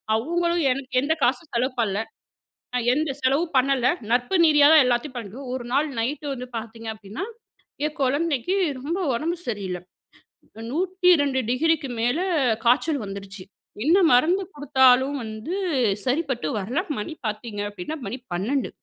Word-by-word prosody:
அவங்களும் 340 +7 0
எனக்கு 265 +1 -4
எந்த 295 +4 +1
காசும் 255 +5 0
செலவு 250 +3 +1
பண்ல. 200 -3 0 0.8
நான் 245 -1 -1
எந்த 300 +1 0
செலவும் 285 +5 +1
பண்ணல 260 -1 +3 0.2
நட்பு 245 +9 +2
நீதியா 295 -2 +6
தான் 310 -3 +8
எல்லாத்தையும் 250 +2 -1
பண்றோம். 235 +5 -7
ஒரு 250 -2 -5
நாள் 290 +3 +2
நைட் 285 +6 -2
வந்து 250 -1 -7
பார்த்தீங்க 225 0 -7
அப்டின்னா, 215 - -7 0.6
என் 305 +1 -6
கொழந்தைக்கு 290 +4 0 0.3
ரொம்ப 305 +7 -3 0.2
உடம்பு 320 +8 -1
சரியில்ல. 195 -5 -3 0.9
102°க்கு 315 - +2
மேல 245 +7 +1 0.5
காச்சல் 275 +4 +3
வந்துருச்சு 195 0 -8 0.4
என்ன 335 +5 +5
மருந்து 330 +11 +4
குடுத்தாலும் 265 -1 +4
வந்து 220 +10 -5 0.5
சரிப்பட்டு 265 - -1
வரல, 235 - -2 0.2
மணி 210 +10 -5
பாத்தீங்க 210 0 -5
அப்டின்னா 205 - -6
மணி 230 +6 -4 0.2
12. 235 +10 -1
260 Hz, 130 wpm, -24 LUFS, 235-310 Hz, 0.9 s, தான்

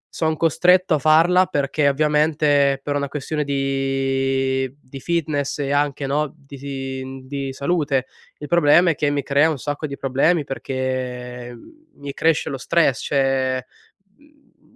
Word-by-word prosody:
sono 160 -1 0
costretto 180 +3 +3
a - - -1
farla 165 +5 +4
perché, 145 -3 +1
ovviamente, 150 -1 +2
per 145 - -2
una 140 -1 -2
questione 150 +1 -3
di 135 -1 -1
di 135 +1 -11
fitness 150 -4 -2
e 140 -1 -2
anche, 145 -1 0
no, 145 +1 -1
di 135 -1 -7
di 135 0 -4
salute. 140 -2 0 0.3
Il 150 - -8
problema 170 +1 +4
è - - -3
che 145 0 0
mi 145 -1 -1
crea 140 +3 +3
un 155 - -2
sacco 145 +3 -4
di 140 -1 -7
problemi 140 +5 +1
perché 125 -2 -4 0.4
mi 140 -1 -7
cresce 160 +1 +1
lo 135 - -4
stress, 150 0 +1
cioè, 135 -2 0 0.5
mhmm, 295 0 -28
140 Hz, 140 wpm, -21 LUFS, 135-155 Hz, 0.5 s, farla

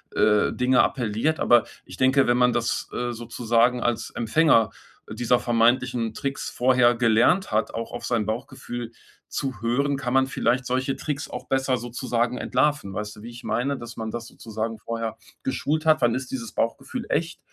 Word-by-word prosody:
äh, 105 -1 +3
Dinge 125 0 +3
appelliert. 120 +5 0
Aber 120 -1 +5 0.2
ich - - -10
denke, 130 +1 +4
wenn 120 0 +3
man 125 0 +4
das, 120 0 -1
äh, 120 0 -2
sozusagen 120 +1 +1
als 115 -2 -1
Empfänger 115 -2 +3 0.4
dieser 120 +2 +2
vermeintlichen 120 -1 +2
Tricks 140 0 -3
vorher 125 -1 +3
gelernt 120 - +3
hat, 110 0 +1
auch 115 0 -4
auf 120 - -6
sein 115 -3 0
Bauchgefühl 120 +1 -5 0.4
zu 130 -5 -4
hören, 140 +5 +1
kann 130 -2 -3
man 135 0 +4
vielleicht 125 -1 0
solche 130 +2 -1
Tricks 145 -1 -4
auch - - -7
besser 130 -1 +1
sozusagen 120 0 -2
entlarven. 145 -10 0
Weißt 105 0 -4
du, 105 - -13
wie 115 - -8
ich 120 0 -11
meine? 140 +3 -1
Dass 120 -1 -9
man 110 -1 -4
das 120 +1 -5
sozusagen 110 0 -5
vorher 115 0 -4 0.3
geschult 155 +4 -1
hat: 155 -2 +4
„Wann 120 -1 +3
ist 130 0 -5
dieses 115 -4 -5
Bauchgefühl 230 - -2
echt? 165 +2 -1
120 Hz, 175 wpm, -24 LUFS, 115-130 Hz, 0.4 s, Aber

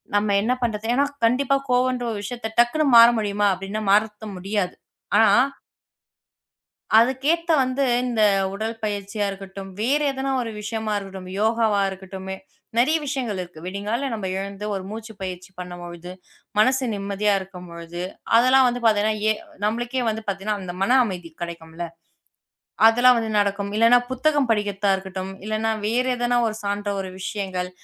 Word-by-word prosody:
நம்ம 205 0 +2
என்ன 235 +4 +1
பண்றது? 220 -2 -2
ஏன்னா, 275 - +3 0.2
கண்டிப்பா 265 +4 +2
கோவம்ன்ற 250 -1 +1
விஷயத்தை 225 +2 -5
டக்குன்னு 240 +6 +3
மாற 230 0 +10
முடியுமா 205 -1 +1
அப்படின்னா 195 +3 -4
மாத்த 210 +1 +2
முடியாது. 195 0 -2 0.4
ஆனா 220 0 +6 1.7
அதுக்கு 260 +3 +2
ஏத்தா 335 -1 +1
வந்து 255 +2 0 0.2
இந்த 230 -3 0 0.3
உடல் 225 +2 -4
பயிற்சியா 205 0 -2
இருக்கட்டும், 195 0 -8
வேறு 285 +6 +2
எதனா 270 0 -3
ஒரு 230 - -4
விஷயமா 215 0 -3
இருக்கட்டும், 190 -2 -7
யோகாவா 220 -2 +2
இருக்கட்டும் 190 0 -9 0.5
நெறைய 305 +7 +4
விஷயங்கள் 250 -8 -2
இருக்கு. 175 -3 -9
விடிங்கால 205 +8 -2
நம்ம 210 -4 -3
எழுந்து 200 +1 -6
ஒரு 190 - -3
மூச்சுப் 220 -1 -8
பயிற்சி 185 0 -6
பண்ணும் 180 -1 -7
பொழுது 175 +1 -8 0.5
மனசு 260 +4 +3
நிம்மதியா 200 +1 0
இருக்கும் 180 -2 -10
பொழுது, 170 +1 -7 0.3
அதெல்லாம் 255 +2 +6
வந்து 245 0 -3
பாத்தீங்கன்னா 215 0 +3
எ - - +5 0.3
நம்மளுக்கே 240 +4 -1
வந்து 220 +1 -4
பாத்தீங்கன்னா, 200 +2 -2
அந்த 175 -1 -6
மன 250 +7 +4
அமைதி 180 -6 -5
கிடைக்கும்ல. 170 0 -6 1.0
அதெல்லாம் 245 +2 +6
வந்து 225 -1 -2
நடக்கும். 200 0 -1
இல்லைனா 230 +2 +6
புத்தகம் 275 0 +1
படிக்கத்தான் 205 -2 +1
இருக்கட்டும், 190 0 -6
இல்லைனா 215 +1 0 0.2
வேறு 250 +3 +1
எதனா 245 0 +1
ஒரு 215 - -3
சாந்த 205 0 -2
ஒரு 190 -1 -5
விஷயங்கள். 190 -2 -3
210 Hz, 145 wpm, -23 LUFS, 195-240 Hz, 1.7 s, மாற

